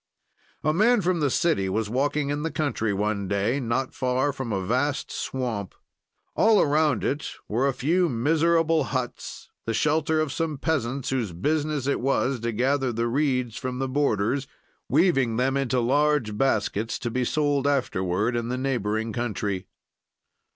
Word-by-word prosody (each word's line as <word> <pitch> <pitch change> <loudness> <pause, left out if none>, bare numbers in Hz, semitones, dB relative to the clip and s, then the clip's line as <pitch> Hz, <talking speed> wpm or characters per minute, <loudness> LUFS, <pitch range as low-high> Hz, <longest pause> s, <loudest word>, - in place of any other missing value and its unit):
"A 155 - +2
man 215 +6 +4
from 180 -1 +1
the 145 -2 +2
city 125 - +1
was 110 +3 -1
walking 140 +5 0
in 145 +1 -2
the 165 - -1
country 140 -9 -1
one 100 0 -1
day, 100 +7 0
not 130 +1 -1
far 130 +2 0
from 130 -4 -5
a 95 -2 -1
vast 130 +7 0
swamp. 115 -7 -3 0.6
"All 220 -2 +5
around 150 -3 +2
it 145 +3 -1 0.2
were 120 +6 +1
a 135 - +1
few 170 +6 +2
miserable 160 +4 +2
huts, 130 -3 -5 0.2
the 115 - 0
shelter 155 +3 +1
of 155 -3 0
some 160 -3 -2
peasants 135 -4 -1
whose 120 -9 -1
business 150 - -1
it 140 - 0
was 135 0 +1
to 115 +1 -2
gather 130 +3 +1
the 115 +1 -1
reeds 125 -3 0
from 130 -1 -4
the 135 +1 -1
borders, 130 -1 0 0.4
weaving 135 -7 +3
them 130 +2 +1
into 130 -2 +1
large 135 -2 +2
baskets 110 -3 0
to 120 - -4
be 125 +2 0
sold 145 +1 +1
afterward 105 -5 0
in 120 -1 -1
the 125 - -1
neighboring 110 -4 -1
country. 105 -5 -2
130 Hz, 160 wpm, -25 LUFS, 115-145 Hz, 0.6 s, All